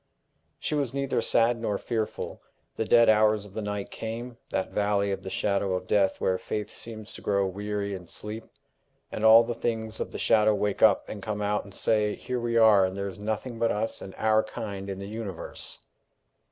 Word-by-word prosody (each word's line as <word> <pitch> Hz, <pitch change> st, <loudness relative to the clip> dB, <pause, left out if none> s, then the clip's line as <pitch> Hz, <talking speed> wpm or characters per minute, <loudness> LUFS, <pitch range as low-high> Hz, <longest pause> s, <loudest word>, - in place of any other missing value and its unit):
She -, -, -3 dB
was 140 Hz, -4 st, -1 dB
neither 140 Hz, -3 st, 0 dB
sad 115 Hz, +1 st, +2 dB
nor 105 Hz, -3 st, 0 dB
fearful. 110 Hz, -1 st, -3 dB, 0.3 s
The 110 Hz, -, -1 dB
dead 115 Hz, +2 st, +6 dB
hours 110 Hz, -1 st, +4 dB
of 100 Hz, -, -14 dB
the 110 Hz, -, -3 dB
night 105 Hz, -1 st, -4 dB
came, 115 Hz, +2 st, -6 dB
that 95 Hz, -, -2 dB
valley 100 Hz, -1 st, +1 dB
of 95 Hz, -, -3 dB
the 95 Hz, -, -6 dB
shadow 100 Hz, -1 st, 0 dB
of 90 Hz, -, -4 dB
death 100 Hz, -1 st, +2 dB
where 95 Hz, 0 st, +1 dB
faith 105 Hz, -1 st, -4 dB
seems 110 Hz, -2 st, -7 dB
to -, -, -10 dB
grow 100 Hz, -1 st, +1 dB
weary 100 Hz, +1 st, -3 dB
and 90 Hz, -3 st, -8 dB
sleep, 110 Hz, +2 st, -5 dB, 0.7 s
and 110 Hz, -, -4 dB
all 110 Hz, +1 st, +9 dB
the 120 Hz, +1 st, -3 dB
things 110 Hz, -1 st, -3 dB
of -, -, -2 dB
the -, -, -6 dB
shadow 110 Hz, -1 st, +4 dB
wake 105 Hz, -1 st, -1 dB
up 105 Hz, -3 st, +5 dB
and 105 Hz, -, -7 dB
come 105 Hz, 0 st, -3 dB
out 105 Hz, 0 st, 0 dB
and 100 Hz, -, -13 dB
say, 105 Hz, -2 st, +1 dB
"Here 125 Hz, -1 st, -4 dB
we 120 Hz, 0 st, 0 dB
are, 110 Hz, -4 st, +7 dB
and 95 Hz, +1 st, -1 dB
there 100 Hz, 0 st, -2 dB
is 95 Hz, -, -11 dB
nothing 110 Hz, +3 st, -3 dB
but 115 Hz, 0 st, +2 dB
us 110 Hz, +2 st, -2 dB
and 95 Hz, -, -9 dB
our 110 Hz, 0 st, +3 dB
kind 100 Hz, -3 st, -6 dB
in 95 Hz, -, -4 dB
the 100 Hz, 0 st, -6 dB
universe!" 105 Hz, -5 st, -5 dB
105 Hz, 205 wpm, -27 LUFS, 100-115 Hz, 0.7 s, all